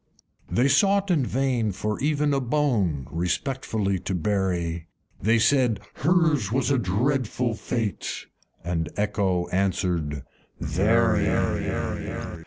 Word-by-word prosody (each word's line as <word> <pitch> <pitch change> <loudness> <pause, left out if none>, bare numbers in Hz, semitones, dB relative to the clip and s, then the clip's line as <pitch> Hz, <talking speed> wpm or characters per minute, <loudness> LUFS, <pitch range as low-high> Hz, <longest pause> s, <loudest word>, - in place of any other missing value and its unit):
V. - - -4
They - - +4
sought 195 +7 +3
in 155 -6 +3
vain 125 -4 0
for 105 +3 -3
even 150 0 +1
a 135 - +2
bone 115 - 0
Respectfully 100 - -1
to 95 - -3
bury; 85 -3 -1 0.3
They 115 +2 +3
said, 125 -2 +3
"Hers 155 - +2
was 130 +1 +1
a 135 - +3
dreadful 120 +3 0
fate!" 110 -1 -3 0.4
(And 80 -2 -2
Echo 100 -4 0
answered, 90 -7 -1 0.4
"Very.") 110 +5 +2
110 Hz, 110 wpm, -25 LUFS, 90-135 Hz, 0.4 s, They